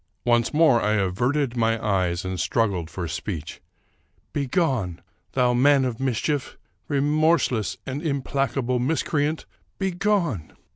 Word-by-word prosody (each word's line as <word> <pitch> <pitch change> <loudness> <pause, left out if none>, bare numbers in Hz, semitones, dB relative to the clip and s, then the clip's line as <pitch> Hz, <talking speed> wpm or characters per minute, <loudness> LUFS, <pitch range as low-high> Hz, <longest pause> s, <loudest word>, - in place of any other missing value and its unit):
Once 120 -1 +3
more 150 -6 +4
I 105 - +1
averted 120 +7 0
my 115 -1 +1
eyes 90 -4 0
and 95 -1 -3
struggled 90 -1 0
for 90 -2 -4
speech: 80 0 -5 0.2
— - - -41
" - - -41
Begone! 135 - 0 0.3
thou 125 -2 +3
man 135 +2 +4
of 120 -3 -3
mischief! 135 +2 -1 0.3
Remorseless 145 - +1
and 135 +2 -4
im 140 -5 -1
placable 135 -2 0
miscreant, 150 +3 0 0.3
begone 180 - 0
125 Hz, 130 wpm, -24 LUFS, 105-145 Hz, 0.3 s, more